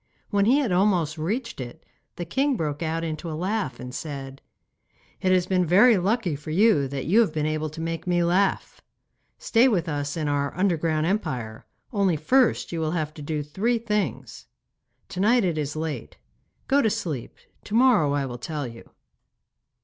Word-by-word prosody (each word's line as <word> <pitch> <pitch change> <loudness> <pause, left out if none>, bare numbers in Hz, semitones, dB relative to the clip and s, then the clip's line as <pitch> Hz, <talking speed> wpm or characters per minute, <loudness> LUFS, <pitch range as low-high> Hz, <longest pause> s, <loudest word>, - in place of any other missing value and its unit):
When 200 -1 +3
he 250 +6 +5
had 270 -9 0
almost 180 -5 +2
reached 225 - -3
it, 120 -1 -9 0.3
the 175 - -5
king 270 - 0
broke 150 -3 -3
out 165 0 -2
into 160 +1 -4
a 155 - -4
laugh 190 - -2
and 125 0 -8
said: 135 -2 -6 0.8
'It 185 - +2
has 185 -1 +3
been 185 -1 +1
very 200 +8 +6
lucky 195 -2 0
for 150 +2 -9
you 185 -4 +3
that 135 -1 -4
you 195 +9 +4
have 225 -8 +3
been 155 -1 -1
able 155 0 -1
to 155 +2 -10
make 165 +1 -4
me 175 -1 +2
laugh. 185 +3 0 0.6
Stay 235 +3 +3
with 185 -9 +1
us 145 -1 -3
in 155 -2 -1
our 140 0 -1
underground 165 -4 +1
empire, 125 - -3 0.3
only 195 -5 +2
first 255 - +2
you 170 - -3
will 160 0 -1
have 155 -1 -3
to 155 - -10
do 150 0 -3
three 210 +11 0
things. 190 - -3 0.6
To 180 - -6
night 230 +4 +4
it 170 -4 0
is 145 0 -3
late. 155 -6 -5 0.5
Go 280 +1 +4
to 220 - +2
sleep; 170 - -4 0.3
to 210 - -4
morrow 225 - +4
I 145 -1 0
will 125 -2 -6
tell 145 +3 -4
you. 115 -1 -10
165 Hz, 185 wpm, -25 LUFS, 150-205 Hz, 0.8 s, very